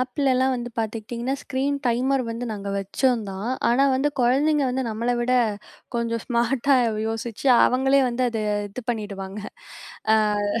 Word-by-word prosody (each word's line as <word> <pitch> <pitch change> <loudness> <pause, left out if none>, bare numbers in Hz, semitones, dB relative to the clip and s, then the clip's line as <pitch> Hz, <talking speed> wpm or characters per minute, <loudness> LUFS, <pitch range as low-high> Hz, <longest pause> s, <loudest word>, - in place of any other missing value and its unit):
ஆப்லல்லாம் 260 0 +1
வந்து 240 0 -5
பார்த்துக்கிட்டீங்கன்னா, 230 +4 -3
screen 275 +1 -1
timer 255 +3 +1
வந்து 230 +2 -4
நாங்க 200 -2 -5
வச்சோம் 225 +5 0
தான். 195 +5 -4 0.2
ஆனா 255 +4 +4
வந்து 270 +3 +2
குழந்தைங்க 280 +5 +3
வந்து, 260 +1 -1
நம்மள 230 +2 -2
விட 245 +1 0 0.6
கொஞ்சம் 230 -1 -1
ஸ்மார்ட்டா 245 +3 +2 0.3
யோசிச்சு, 225 +3 -4 0.2
அவங்களே 270 +2 +3
வந்து 245 +1 -1
அதை 225 -2 -3 0.3
இது 250 +6 -8
பண்ணிடுவாங்க. 200 -3 -5 1.2
அ - - -2
240 Hz, 135 wpm, -24 LUFS, 225-265 Hz, 1.2 s, ஆனா